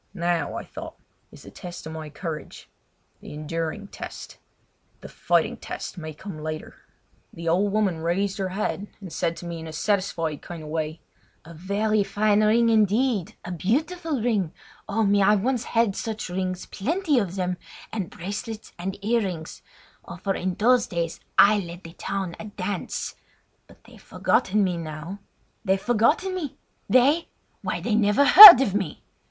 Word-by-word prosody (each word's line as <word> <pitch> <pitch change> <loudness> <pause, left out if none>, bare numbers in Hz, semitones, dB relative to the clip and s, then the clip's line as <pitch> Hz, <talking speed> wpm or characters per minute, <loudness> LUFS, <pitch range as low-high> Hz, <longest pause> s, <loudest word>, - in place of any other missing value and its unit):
Now, 170 -3 -1
I - - -4
thought, - - -9 0.4
is - - -14
the - - -12
test 175 -1 -9
of 160 - -7
my 155 -1 -7
courage—the 155 -1 -10
enduring 165 +6 -4
test: - - -9 0.6
the - - -9
fighting - - 0
test - - -7
may 155 -3 -7
come 155 +1 -9
later! 155 0 -6 0.6
The 170 0 -8
old 190 +5 +2
woman 200 -5 0
raised 190 +5 -1
her 190 -1 -1
head 200 +1 -3
and 190 -5 -10
said 165 - -1
to - - -9
me 170 -1 -5
in 160 - -8
a - - -7
satisfied 165 -3 -1
kind 170 -2 -9
of 150 - -9
way: 155 0 -3 0.4
"A 170 - -11
very 200 +5 0
fine 210 +1 +2
ring, 230 +2 +4
indeed—a 215 -4 +1
beautiful 290 - -1
ring! 205 -9 0 0.4
Oh, 220 +2 +1
me! 200 0 +3
I 205 +2 +5
once 240 +4 -1
had 230 -4 +1
such 220 -4 -4
rings, 185 0 -3
plenty 310 - 0
of 190 -4 -3
them, 180 -1 -2 0.4
and 200 -6 -3
bracelets 205 +4 -7
and 190 +2 -4
earrings! 195 -8 -2 0.4
Oh! 170 - -9
for 195 +2 -2
in 185 -1 -3
those 240 +3 +3
fine 175 - -8
days 165 -1 -3 0.2
I 210 +1 +6
led 175 -1 -8
the 165 - -11
town 190 -2 -4
a - - -7
dance! 200 -2 -4 0.5
But - - -20
they've - - -17
forgotten 210 +2 +1
me 180 -2 -1
now! 165 +4 -7 0.4
They've 190 -2 +1
forgotten 245 - +1
me! 330 -8 -5 0.3
They? 280 +7 +4 0.3
Why - - -3
they 230 - -1
never 210 +5 +3
heard 365 - +13
of 205 -8 0
me! 195 -7 -3
195 Hz, 165 wpm, -24 LUFS, 170-215 Hz, 0.6 s, heard